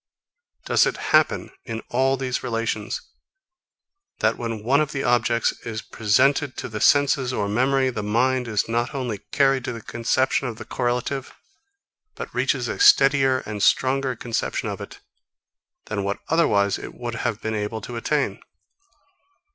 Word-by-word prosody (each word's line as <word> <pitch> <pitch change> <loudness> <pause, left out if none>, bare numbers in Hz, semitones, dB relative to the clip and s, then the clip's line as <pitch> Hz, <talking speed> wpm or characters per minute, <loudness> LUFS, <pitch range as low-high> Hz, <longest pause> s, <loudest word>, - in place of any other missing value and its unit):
Does - - +4
it - - -2 0.2
happen, - - +3
in 115 -2 -5
all 135 +2 +2
these 130 -1 -2
relations, 115 - -3 1.1
that, 110 +1 +1
when 115 -3 -5
one 135 +6 +3
of 150 -1 -2
the 135 - -2
objects 120 -1 +2
is 110 -1 -5
presented 130 +6 +1
to - - -4
the 105 -2 -6
senses 140 -3 +3
or 105 -5 -1
memory, 130 +5 +2
the 110 - -4
mind 125 +4 +1
is 105 -3 0
not 120 +3 -1
only 120 -6 -3
carried 135 -2 +3
to - - -2
the 115 - -7
conception 125 +3 0
of 115 -3 -6
the - - -8
correlative, 125 +2 -2 0.8
but - - -7
reaches - - 0
a - - -4
steadier 135 - +5
and 105 -1 -5
stronger 130 +3 +2
conception 115 0 -2
of - - -5
it - - -10 0.8
than 100 -1 -3
what 100 +1 -2
otherwise 100 -12 +2
it - - -9
would 120 -1 -5
have 115 -2 -1
been 110 -1 -3
able 105 +1 -3
to 120 +4 -7
attain? 140 +5 -1
120 Hz, 155 wpm, -23 LUFS, 110-135 Hz, 1.1 s, steadier